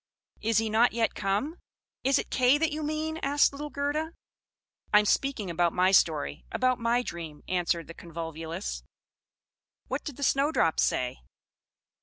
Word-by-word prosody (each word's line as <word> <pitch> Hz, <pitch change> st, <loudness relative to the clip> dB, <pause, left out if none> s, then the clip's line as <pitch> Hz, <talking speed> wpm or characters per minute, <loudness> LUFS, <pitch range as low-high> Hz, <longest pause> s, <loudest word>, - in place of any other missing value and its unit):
"'Is 225 Hz, -1 st, +1 dB
he 225 Hz, 0 st, +2 dB
not 225 Hz, +3 st, +3 dB
yet 230 Hz, -1 st, +1 dB
come?'" 210 Hz, -, -1 dB, 0.4 s
"Is 270 Hz, +1 st, +4 dB
it -, -, -4 dB
Kay 255 Hz, +2 st, +4 dB
that 320 Hz, +1 st, +1 dB
you 305 Hz, +1 st, -3 dB
mean?" 310 Hz, +1 st, -2 dB
asked 285 Hz, +1 st, +3 dB
little 295 Hz, +1 st, -6 dB
Gerda. 295 Hz, +3 st, -2 dB, 0.8 s
"I 210 Hz, -, +7 dB
am 210 Hz, -, +4 dB
speaking 220 Hz, -5 st, 0 dB
about 170 Hz, 0 st, +1 dB
my 185 Hz, +1 st, +3 dB
story 150 Hz, -, +2 dB
about 255 Hz, -1 st, +1 dB
my 235 Hz, +1 st, +1 dB
dream," 160 Hz, -7 st, -7 dB
answered 175 Hz, -2 st, 0 dB
the 165 Hz, -, -10 dB
Convolvulus. 165 Hz, +1 st, -6 dB, 1.1 s
What -, -, -2 dB
did 290 Hz, -5 st, -7 dB
the 285 Hz, -, -5 dB
Snowdrops 275 Hz, -, +2 dB
say? 125 Hz, -1 st, -1 dB
225 Hz, 155 wpm, -28 LUFS, 170-285 Hz, 1.1 s, I